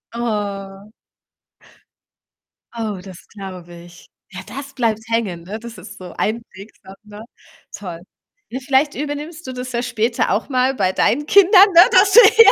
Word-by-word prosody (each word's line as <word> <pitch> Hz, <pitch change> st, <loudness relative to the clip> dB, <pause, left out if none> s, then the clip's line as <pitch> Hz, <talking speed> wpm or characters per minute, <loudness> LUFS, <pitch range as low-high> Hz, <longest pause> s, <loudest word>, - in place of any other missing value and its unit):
Oh. 205 Hz, -3 st, -5 dB, 1.8 s
Oh, 220 Hz, -5 st, -4 dB
das 185 Hz, -3 st, -13 dB
glaube 185 Hz, -4 st, -10 dB
ich. 175 Hz, 0 st, -16 dB, 0.2 s
Ja, 190 Hz, -, -8 dB
das 275 Hz, +1 st, -8 dB
bleibt 225 Hz, -4 st, -1 dB
hängen, 215 Hz, -7 st, -2 dB
ne? 205 Hz, +5 st, -7 dB
Das 235 Hz, -1 st, -11 dB
ist 185 Hz, +3 st, -12 dB
so 185 Hz, -1 st, -10 dB
einprägsam, 210 Hz, -3 st, -6 dB
ne? 210 Hz, 0 st, -12 dB, 0.5 s
Toll. 175 Hz, -5 st, -8 dB, 0.5 s
Ne, 255 Hz, -, -5 dB
vielleicht 275 Hz, +2 st, +1 dB
übernimmst 300 Hz, +3 st, -6 dB
du 260 Hz, -, -5 dB
das 250 Hz, 0 st, -7 dB
ja 235 Hz, 0 st, -2 dB
später 230 Hz, -1 st, -1 dB
auch 210 Hz, +8 st, -1 dB
mal 255 Hz, 0 st, +1 dB
bei 190 Hz, -5 st, 0 dB
deinen 265 Hz, +9 st, 0 dB
Kindern, 400 Hz, +2 st, +6 dB
ne? 340 Hz, -, +9 dB
Dass 380 Hz, +1 st, +5 dB
du 475 Hz, -, +10 dB
hier 440 Hz, -1 st, +7 dB
230 Hz, 155 wpm, -19 LUFS, 195-275 Hz, 1.8 s, du